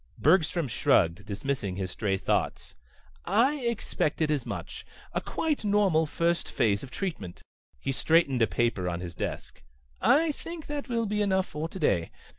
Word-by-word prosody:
Bergstrom 165 -1 +3
shrugged, 105 - +2
dismissing 105 -2 -2
his 95 -1 -3
strayed 95 -2 -2
thoughts. - - -1 0.5
"I 235 +11 +3
expected 185 - -1
as 145 -5 -1
much. - - -6 0.3
A - - 0
quite 310 -6 -1
normal 200 -6 +3
first 170 +3 0
phase 100 -2 +1
of 135 - -8
treatment." 135 - -5 0.4
He 135 - -2
straightened 140 -2 +3
a 115 - +5
paper 95 -2 0
on 85 -1 -3
his 90 -1 -6
desk. - - -5 0.4
"I 310 +4 +4
think 330 +2 -8
that 290 -2 -5
will 230 -1 0
be 210 0 -1
enough 190 -2 +2
for 155 +2 -5
today. 100 - 0
155 Hz, 155 wpm, -28 LUFS, -, 0.5 s, a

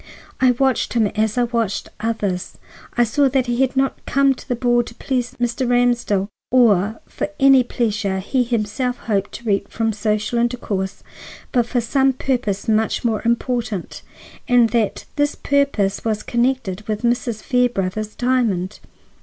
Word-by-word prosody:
I 260 - +5
watched 260 0 +1
him 230 -2 +3
as 215 +2 -1
I 245 - +3
watched 230 -4 -1
others. 210 -5 -2 0.4
I 240 - +5
saw 275 +4 +2
that 260 -1 +1
he 240 +1 0
had 265 0 +1
not 270 0 0
come 275 0 +3
to - - -14
the 250 - 0
ball 240 0 +2
to 230 -1 -9
please 250 -1 -2
Mr. 240 +1 -1
Ramsdell 240 -5 +2 0.2
or 220 -4 +3
for - - -4
any 270 -1 +7
pleasure 215 -5 -1
he 225 +7 0
himself 240 +2 -1
hoped 200 -3 -1
to - - -8
reap 200 -2 0
from 225 -1 -1
social 210 +2 -1
intercourse, 220 -5 -2 0.5
but 240 -3 +2
for 245 0 0
some 265 +3 +2
purpose 240 -6 -2
much 220 +2 +1
more 220 -3 +1
important, 235 -4 -2 0.5
and 245 -2 +5
that 225 -3 0
this 290 0 +1
purpose 280 -9 0
was 215 -2 -1
connected 240 -5 0
with 215 +1 -3
Mrs. 235 -2 0
Fairbrother's 215 -4 0
diamond. 225 -7 0
235 Hz, 155 wpm, -20 LUFS, 210-250 Hz, 0.5 s, any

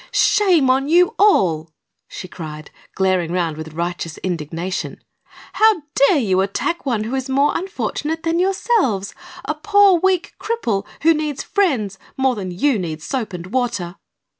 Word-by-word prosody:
"Shame 365 - +3
on 270 +2 0
you 355 +2 +4
all!" 170 - +3 0.4
she 185 - -8
cried, 155 -4 -9 0.2
glaring 185 -3 +1
around 170 -3 -1
with 160 0 -8
righteous 170 0 -4
indignation. 170 +1 -4 0.6
"How 435 -7 +3
dare 280 +5 +4
you 190 -8 +2
attack 275 - -2
one 230 -5 0
who 225 +4 -5
is 265 0 -2
more 280 +2 +2
unfortunate 325 -4 -3
than 330 +1 0
yourselves 370 - +1 0.3
a - - -1
poor, 400 +2 +4
weak 375 -1 +1
cripple, 240 - -2 0.2
who 330 +1 +6
needs 305 -3 -3
friends 250 - 0 0.2
more 265 -1 +2
than 195 -5 -5
you 220 +7 +1
need 160 -3 -5
soap 250 -2 -3
and 175 -2 -7
water?" 205 -8 -2
250 Hz, 150 wpm, -20 LUFS, -, 0.6 s, who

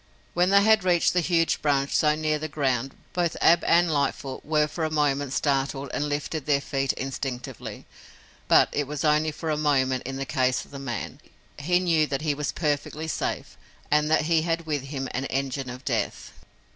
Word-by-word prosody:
When 175 +1 +2
they 200 0 +5
had 220 -2 +4
reached 175 -2 +3
the 180 - +3
huge 165 -1 +1
branch 140 -2 +1
so 150 -1 +3
near 155 0 0
the 155 - -3
ground 135 -3 -1 0.2
both 175 -2 0
Ab 170 0 +5
and 170 0 +4
Lightfoot 140 -2 -2
were 150 0 +2
for 160 +2 -4
a 155 - 0
moment 145 -3 0
startled 140 -1 -1
and 150 0 -1
lifted 145 0 -3
their 145 -2 +3
feet 135 -1 -1
instinctively, 135 -2 -6 0.6
but - - +6
it 145 -2 -1
was 150 +2 -3
only 155 +1 +3
for 155 +1 -4
a 150 - 0
moment 130 -4 +1
in 135 - -4
the 135 0 -3
case 130 -2 0
of - - -21
the 140 - -7
man. 120 -6 -5 0.4
He 175 +5 +2
knew 165 -4 +2
that 140 +1 -3
he 150 -2 +1
was 145 0 -2
perfectly 150 0 -2
safe - - -3 0.3
and 150 0 +3
that 155 - +4
he 165 0 +2
had 165 0 -1
with 145 -4 -2
him 135 -1 -4
an 130 +2 -3
engine 135 -1 -2
of 125 +1 -9
death. - - -2
150 Hz, 195 wpm, -25 LUFS, 135-160 Hz, 0.6 s, but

